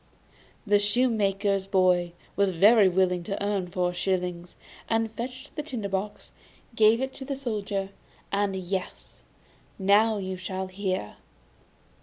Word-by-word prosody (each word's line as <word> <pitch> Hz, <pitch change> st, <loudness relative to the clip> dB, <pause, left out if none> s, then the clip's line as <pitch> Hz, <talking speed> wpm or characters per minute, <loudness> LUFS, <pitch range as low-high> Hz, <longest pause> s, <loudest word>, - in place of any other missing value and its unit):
The 205 Hz, -1 st, +4 dB
shoemaker's 205 Hz, -3 st, +1 dB
boy 180 Hz, -3 st, +2 dB, 0.2 s
was 200 Hz, -2 st, +2 dB
very 205 Hz, +3 st, +6 dB
willing 180 Hz, -1 st, +2 dB
to 200 Hz, -1 st, -3 dB
earn 200 Hz, -3 st, -1 dB
four 180 Hz, -1 st, -1 dB
shillings, 180 Hz, -1 st, -2 dB, 0.3 s
and 225 Hz, -1 st, +1 dB
fetched 255 Hz, +4 st, -7 dB
the 300 Hz, -, -2 dB
tinder 245 Hz, -9 st, -5 dB
box, 195 Hz, +2 st, -4 dB, 0.4 s
gave 220 Hz, +2 st, +5 dB
it 265 Hz, 0 st, -2 dB
to 270 Hz, -, -7 dB
the 275 Hz, +1 st, -3 dB
Soldier, 205 Hz, -6 st, -3 dB, 0.4 s
and 200 Hz, -1 st, 0 dB
yes 185 Hz, 0 st, -5 dB, 0.6 s
now 210 Hz, +3 st, +4 dB
you 190 Hz, -1 st, -4 dB
shall 190 Hz, 0 st, -4 dB
hear. 185 Hz, -, -3 dB
200 Hz, 130 wpm, -27 LUFS, 185-220 Hz, 0.6 s, very